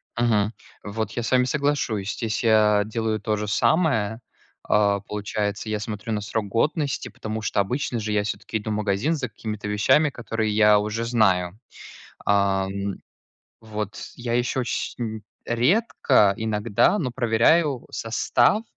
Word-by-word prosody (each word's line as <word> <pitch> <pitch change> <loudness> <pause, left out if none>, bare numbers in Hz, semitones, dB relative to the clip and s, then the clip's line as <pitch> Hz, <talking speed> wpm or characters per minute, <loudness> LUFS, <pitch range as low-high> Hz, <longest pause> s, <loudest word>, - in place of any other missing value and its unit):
Мгм. 110 -2 +1 0.3
Вот, 110 +2 -3
я 120 - -3
с - - -3
вами 125 -1 +4
соглашусь, 130 -7 -1
здесь 110 0 -3
я 105 -2 +4
делаю 110 0 -2
то 105 +1 -1
же 105 - -3
самое. 110 - +1 0.4
А, 100 -1 +2
получается, 105 +1 -3
я 105 -1 -1
смотрю 105 +1 -5
на 105 -1 -1
срок 105 0 -3
годности, 140 - 0
потому 110 0 -5
что 105 -1 -1
обычно 120 +3 -1
же 110 0 -3
я 105 -1 +1
всё-таки 110 +1 -3
иду 110 +1 -6
в - - 0
магазин 105 +9 0
за 125 -6 -3
какими-то 105 0 -6
вещами, 110 +9 +3
которые 110 -4 -2
я 105 -1 +5
уже 105 +2 -2
знаю, 95 -6 +2 0.7
ам. 100 -1 +1 0.7
Вот, 105 -2 -6
я 120 -1 -4
еще 125 +2 0
очень 115 -2 -3 0.2
редко, 125 - +3
иногда, 110 - +1
но 130 -6 -2
проверяю 125 +4 +2
состав, 120 - +1
110 Hz, 145 wpm, -24 LUFS, 105-120 Hz, 0.7 s, я